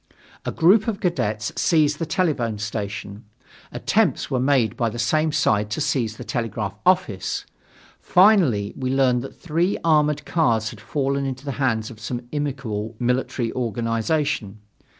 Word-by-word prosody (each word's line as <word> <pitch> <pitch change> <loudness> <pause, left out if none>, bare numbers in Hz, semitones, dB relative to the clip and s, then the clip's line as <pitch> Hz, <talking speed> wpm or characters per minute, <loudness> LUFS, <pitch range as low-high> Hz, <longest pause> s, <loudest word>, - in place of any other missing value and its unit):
A - - -1
group 195 +7 +4
of 220 -3 -1
cadets 110 - -1
seized 150 -3 +2
the 165 - -2
telephone 150 - 0
station. 105 0 -5 0.5
Attempts - - 0
were 130 - +1
made 130 -3 +2
by 115 -3 0
the 115 - -7
same 155 +5 +1
side 105 -7 +1
to 105 - -3
seize 115 -7 -1
the - - -7
telegraph 115 -5 -3
office. 175 - +1 0.5
Finally, 175 - +4
we 130 -1 -3
learned 130 -2 +2
that 135 - -10
three 175 +4 0
armored 150 -2 +2
cars 115 -9 +1
had 110 - -12
fallen 140 +2 -1
into 130 +1 -6
the 140 - -2
hands 115 -3 0
of 110 - -12
some 120 +3 -4
inimical 125 -7 -3
military 125 -1 -1
organization. 115 0 -1
125 Hz, 150 wpm, -23 LUFS, 110-150 Hz, 0.5 s, group